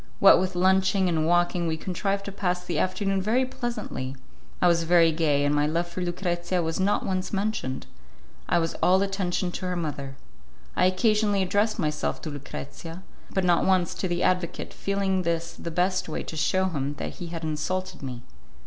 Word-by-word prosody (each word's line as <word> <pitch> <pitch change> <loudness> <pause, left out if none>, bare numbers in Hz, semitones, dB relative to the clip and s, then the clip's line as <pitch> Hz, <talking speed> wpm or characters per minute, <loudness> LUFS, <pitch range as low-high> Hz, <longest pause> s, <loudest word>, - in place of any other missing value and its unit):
What 195 - +8
with 185 0 -1
lunching 190 +1 +3
and 160 -2 +1
walking 175 0 +2
we 160 0 -1
contrived 195 +3 -2
to 200 - -4
pass 180 -2 -1
the 170 -4 -1
afternoon 195 +1 0
very 235 +7 +2
pleasantly; 235 - -4 0.4
I 180 - +4
was 170 -1 +4
very 165 0 +5
gay, 150 -3 +2
and 145 - +2
my 145 0 +2
love 170 +3 0
for 185 - -5
Lucrezia 175 0 -1
was 160 +3 -2
not 195 +2 +1
once 185 -1 -2
mentioned; 195 -10 -2 0.6
I - - +3
was 165 -1 0
all 190 +2 +5
attention 190 -2 -1
to 185 - -4
her 180 - -1
mother. 145 -5 -4 0.6
I 180 - +4
occasionally 205 +1 +2
addressed 205 +4 +1
myself 150 -6 -1
to 155 - -4
Lucrezia, 165 +4 -8 0.3
but 190 - 0
not 175 -1 +4
once 185 -3 +2
to 185 - -2
the 175 0 -1
advocate, 180 -2 0
feeling 195 -1 0
this 170 -1 -1
the 170 - -6
best 180 +1 0
way - - -3
to - - -7
shew 185 +4 +2
him 145 -3 -2
that - - -6
he 175 - -6
had 165 -1 -6
insulted 185 +4 -3
me. 125 -3 -6
180 Hz, 185 wpm, -26 LUFS, 165-190 Hz, 0.6 s, What